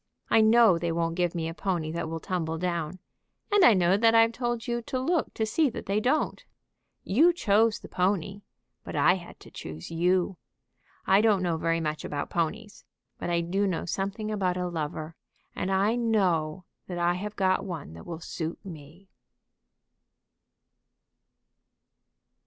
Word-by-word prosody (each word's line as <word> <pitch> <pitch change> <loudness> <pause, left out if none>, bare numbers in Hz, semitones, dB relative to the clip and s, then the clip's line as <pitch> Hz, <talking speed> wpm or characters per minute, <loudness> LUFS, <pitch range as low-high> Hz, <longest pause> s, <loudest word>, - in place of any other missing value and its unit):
I 225 - +6
know 220 -5 +5
they 170 0 -1
won't 165 0 -1
give 175 0 -1
me 165 -1 -2
a 165 - -4
pony 170 -4 -2
that 160 -1 -3
will 165 0 -4
tumble 165 -3 -3
down; 170 -1 -2 0.5
and 410 -2 +5
I 235 - +7
know 185 +1 +3
that 225 +1 +4
I've 225 0 +6
told 240 -1 -3
you 240 -1 -2
to 255 +2 -3
look 330 +5 0
to 220 - 0
see 285 +7 +2
that - - -7
they 200 +2 +1
don't. 255 +8 0 0.6
You 300 - +4
chose 225 -8 +2
the - - -11
pony, 195 +1 -1 0.4
but - - -7
I - - +5
had - - -8
to - - -14
choose 80 - -8
you. 180 +2 +1 0.7
I 195 +2 +5
don't 210 -4 +3
know 170 -2 0
very 165 +1 0
much 155 -1 -3
about 145 -1 -4
ponies, 205 +6 -3 0.4
but - - -3
I 170 0 +1
do 195 +4 0
know 180 -4 -2
something 200 +4 -3
about 185 -4 0
a 180 0 -1
lover, 155 -1 -4 0.4
and 185 - -2
I 195 +3 +2
know 185 -8 0 0.2
that 180 - -5
I 175 0 +2
have 205 +4 -5
got 185 -1 +1
one 165 - -6
that 85 - -12
will 165 -2 -6
suit 165 0 -5
me." 165 +2 -11
185 Hz, 170 wpm, -27 LUFS, 165-215 Hz, 0.7 s, I